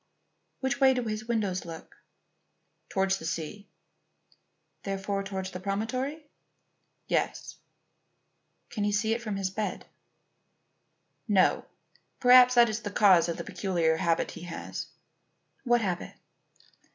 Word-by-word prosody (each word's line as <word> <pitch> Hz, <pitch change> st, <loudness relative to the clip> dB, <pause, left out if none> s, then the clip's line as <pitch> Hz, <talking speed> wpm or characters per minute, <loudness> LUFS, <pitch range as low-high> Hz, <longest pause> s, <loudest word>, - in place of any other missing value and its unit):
"Which 265 Hz, +1 st, -1 dB
way 265 Hz, -1 st, +6 dB
do 250 Hz, -, -1 dB
his 215 Hz, -1 st, -4 dB
windows 205 Hz, -6 st, -1 dB
look?" 165 Hz, -1 st, -10 dB, 0.9 s
"Towards 190 Hz, 0 st, +1 dB
the -, -, -8 dB
sea." 170 Hz, +6 st, -5 dB, 1.1 s
"Therefore 195 Hz, 0 st, -3 dB
towards 190 Hz, -1 st, -5 dB
the 180 Hz, -, -6 dB
promontory?" 255 Hz, -, -3 dB, 0.8 s
"Yes." -, -, -2 dB, 1.1 s
"Can 215 Hz, -4 st, -2 dB
he 205 Hz, -, +1 dB
see 210 Hz, +2 st, +1 dB
it 235 Hz, -, -3 dB
from 215 Hz, -3 st, -4 dB
his 195 Hz, -1 st, -2 dB
bed?" 200 Hz, -1 st, -4 dB, 1.4 s
"No. 195 Hz, -4 st, +3 dB, 0.5 s
Perhaps 250 Hz, 0 st, +7 dB
that 240 Hz, -1 st, +7 dB
is 215 Hz, 0 st, -3 dB
the 205 Hz, -, -4 dB
cause 190 Hz, -4 st, +5 dB
of 170 Hz, -, -3 dB
a -, -, -3 dB
peculiar 170 Hz, -5 st, 0 dB
habit 165 Hz, 0 st, 0 dB
he 170 Hz, -, -10 dB
has." 170 Hz, -1 st, -6 dB, 0.8 s
"What 240 Hz, -1 st, +3 dB
habit?" 180 Hz, -4 st, -3 dB
205 Hz, 125 wpm, -28 LUFS, 185-235 Hz, 1.4 s, Perhaps